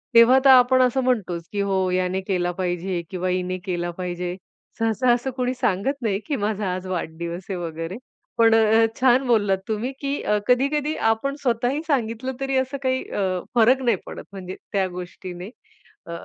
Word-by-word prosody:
तेव्हा 230 +3 +8
तर - - +8
आपण 255 0 +7
असं 255 +1 +2
म्हणतोच, 200 -9 0
की 205 - -1
हो 190 -2 +1
याने 185 +1 0
केला 180 -2 -1
पाहिजे 180 0 -2
किंवा 185 -1 -2
हिने 185 0 -1
केला 175 -2 -2
पाहिजे. 180 0 -4 0.4
सहसा 225 +3 +2
असं 245 +2 -2
कोणी 250 0 0
सांगत 245 +1 0
नाही, 205 -4 0
की 300 - 0
माझा 205 -4 -1
आज 185 0 -6
वाढदिवस 170 0 -4
आहे 190 - -2
वगैरे 165 +2 -5 0.4
पण 230 -1 +5
अ, 225 0 +5
छान 260 0 +4
बोललात 205 -5 +3
तुम्ही 220 +4 -2
की 280 0 -2
अ, 210 - +2
कधी-कधी 280 +4 +2 0.2
आपण 275 +5 -2
स्वतःही 245 +3 0
सांगितलं 255 -2 -1
तरी 270 0 0
असं 260 +2 -1
काही 260 0 0
अ, - - -2 0.3
फरक 245 +3 +5
नाही 240 -2 +2
पडत - - -8
म्हणजे 190 -1 -7 0.2
त्या 195 -2 +2
गोष्टीने. 180 +1 -7 0.6
अ, - - -9
215 Hz, 175 wpm, -23 LUFS, 185-255 Hz, 0.6 s, तेव्हा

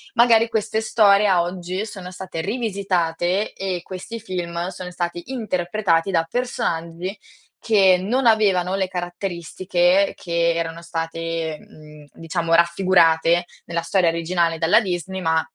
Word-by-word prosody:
Magari 230 -1 +5
queste 220 0 -1
storie, 210 -2 +4
a 185 -3 +4
oggi, 180 +3 -4
sono 185 -4 -8
state 185 -3 -6
rivisitate 190 -3 -1
e 185 -2 -3
questi 190 +6 -7
film 175 -4 -4
sono 185 -1 -7
stati 175 +4 -4
interpretati 195 -5 0
da 165 -2 +1
personaggi 185 -6 -3 0.4
che 195 -5 +4
non 240 +8 -1
avevano 195 -5 +3
le 190 -1 -1
caratteristiche 180 +1 0
che 170 -1 0
erano 165 0 -3
state, 165 -1 -4
mhmm, 150 -1 -15
diciamo, 165 0 -2
raffigurate 170 -1 +4 0.2
nella 170 0 -2
storia 170 +1 +2
originale 165 0 0
dalla 165 +7 +4
Disney, 190 -1 -4
ma 160 -1 +2
180 Hz, 125 wpm, -22 LUFS, 170-195 Hz, 0.4 s, Magari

